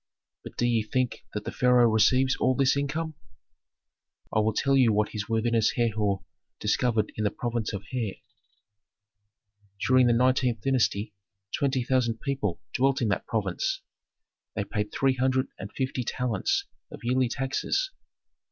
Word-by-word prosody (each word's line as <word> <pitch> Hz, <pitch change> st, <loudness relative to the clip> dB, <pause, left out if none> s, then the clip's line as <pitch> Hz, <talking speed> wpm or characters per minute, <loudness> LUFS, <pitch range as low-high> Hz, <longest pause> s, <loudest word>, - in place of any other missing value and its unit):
But -, -, -10 dB
do 120 Hz, -, +1 dB
ye 120 Hz, -2 st, +2 dB
think 125 Hz, +3 st, -2 dB
that 105 Hz, -, -2 dB
the -, -, -3 dB
pharaoh 125 Hz, -1 st, +4 dB
receives 125 Hz, +4 st, +3 dB
all 130 Hz, 0 st, +2 dB
this 135 Hz, 0 st, +3 dB
income? 155 Hz, +3 st, -2 dB, 1.2 s
"I -, -, +5 dB
will 110 Hz, +1 st, +1 dB
tell 135 Hz, 0 st, +2 dB
you 125 Hz, -4 st, +5 dB
what 105 Hz, 0 st, +1 dB
his 105 Hz, -1 st, -5 dB
worthiness 115 Hz, -1 st, +2 dB
Herhor 105 Hz, -5 st, 0 dB, 0.4 s
discovered 110 Hz, 0 st, +1 dB
in 110 Hz, -, -1 dB
the 105 Hz, -, +3 dB
province 115 Hz, 0 st, -3 dB
of 100 Hz, -1 st, -5 dB
the 125 Hz, -3 st, -1 dB
Hare. 95 Hz, -, -6 dB, 1.7 s
"During 130 Hz, -1 st, +5 dB
the 120 Hz, -, +4 dB
nineteenth 125 Hz, -2 st, +2 dB
dynasty 105 Hz, -5 st, +1 dB, 0.4 s
twenty 130 Hz, -3 st, 0 dB
thousand 120 Hz, -3 st, +1 dB
people 135 Hz, -, -2 dB
dwelt 135 Hz, +1 st, +2 dB
in 115 Hz, -, +1 dB
that 100 Hz, -, -1 dB
province; 100 Hz, -5 st, -1 dB, 0.7 s
they 100 Hz, -, 0 dB
paid 105 Hz, 0 st, -3 dB
three 135 Hz, -1 st, +2 dB
hundred 130 Hz, +1 st, +1 dB
and 100 Hz, -, -7 dB
fifty 130 Hz, -1 st, -2 dB
talents 120 Hz, -4 st, -1 dB, 0.2 s
of -, -, -10 dB
yearly 125 Hz, +1 st, +2 dB
taxes. 135 Hz, -, -1 dB
120 Hz, 150 wpm, -27 LUFS, 110-130 Hz, 1.7 s, I